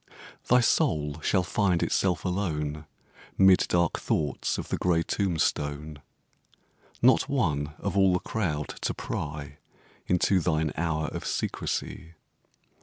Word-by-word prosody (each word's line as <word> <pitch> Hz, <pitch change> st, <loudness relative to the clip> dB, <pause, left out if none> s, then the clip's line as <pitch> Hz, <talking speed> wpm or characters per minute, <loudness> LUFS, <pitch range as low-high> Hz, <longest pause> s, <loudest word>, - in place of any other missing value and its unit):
Thy 125 Hz, 0 st, +5 dB
soul 75 Hz, -8 st, +1 dB
shall 95 Hz, +3 st, +2 dB
find 95 Hz, -2 st, +1 dB
itself 90 Hz, -4 st, 0 dB
alone 75 Hz, -5 st, -2 dB, 0.5 s
'Mid 95 Hz, -1 st, +5 dB
dark 85 Hz, -1 st, +1 dB
thoughts 75 Hz, -3 st, -1 dB
of -, -, -6 dB
the -, -, -1 dB
gray 85 Hz, -2 st, +1 dB
tombstone 75 Hz, -5 st, -1 dB, 1.0 s
Not 130 Hz, +2 st, +5 dB
one, 75 Hz, -, 0 dB
of 100 Hz, -1 st, -3 dB
all 95 Hz, -1 st, +5 dB
the -, -, +3 dB
crowd, 80 Hz, -11 st, -2 dB
to -, -, -1 dB
pry 75 Hz, -1 st, -5 dB, 0.5 s
Into 90 Hz, +1 st, +3 dB
thine 80 Hz, -3 st, 0 dB
hour 80 Hz, -1 st, -1 dB
of -, -, -6 dB
secrecy. 85 Hz, +1 st, -3 dB
80 Hz, 120 wpm, -27 LUFS, 75-95 Hz, 1.0 s, Thy